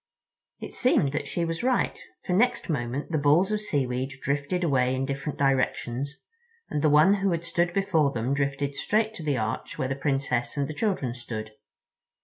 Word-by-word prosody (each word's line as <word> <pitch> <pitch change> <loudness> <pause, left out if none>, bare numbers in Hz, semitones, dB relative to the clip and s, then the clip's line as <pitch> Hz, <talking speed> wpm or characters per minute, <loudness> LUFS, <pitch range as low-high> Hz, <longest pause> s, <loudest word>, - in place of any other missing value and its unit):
It - - -8
seemed 160 - +3
that 150 - -3
she 170 - -1
was 165 0 -3
right, 255 +1 +1 0.3
for 180 - -1
next 240 +2 +2
moment 135 0 -2
the 155 - +1
balls 155 +8 +4
of 210 0 0
seaweed 135 -7 -1
drifted 145 +6 -1
away 130 -5 +2
in 130 +1 -1
different 140 +2 -4
directions, 135 0 0 0.6
and 150 - 0
the 155 - +4
one 155 +6 +6
who 195 - +2
had 170 -1 -1
stood 170 0 +1
before 175 -6 +2
them 120 +2 -1
drifted 140 0 -1
straight 215 +8 0
to 205 - -7
the 145 -3 0
arch 110 0 -3
where 130 - -1
the 135 - -1
Princess 135 -2 -1
and 140 -1 0
the 155 - -5
children 165 - -1
stood. 110 -3 -6
145 Hz, 185 wpm, -27 LUFS, 135-170 Hz, 0.6 s, one